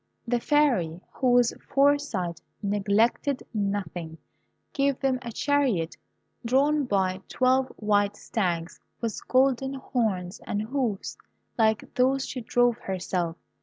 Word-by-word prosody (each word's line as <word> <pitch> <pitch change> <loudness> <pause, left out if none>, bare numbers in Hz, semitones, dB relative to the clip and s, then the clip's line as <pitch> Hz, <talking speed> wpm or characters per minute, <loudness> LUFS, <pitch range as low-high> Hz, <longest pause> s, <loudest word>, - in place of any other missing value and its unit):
The 240 0 +1
Fairy, 235 - +2
whose 245 -2 +3 0.2
foresight 275 -12 +1 0.2
neglected 210 +7 +1
nothing, 195 -6 -3 0.6
gave 275 -1 +1
them 265 -2 +1
a 240 -2 -6
chariot, 245 - +1 0.5
drawn 280 +4 +2
by 190 -4 0
twelve 260 +1 +2
white 205 -1 +1
stags 175 -7 -2 0.2
with 230 -3 -3
golden 265 +1 +2
horns 215 -8 -2
and 205 +1 -1
hoofs, 235 -4 -2 0.4
like 220 -2 +1
those 265 +2 +2
she 255 - -5
drove 245 0 +2
herself. 180 -3 -2
230 Hz, 110 wpm, -27 LUFS, 195-265 Hz, 0.6 s, whose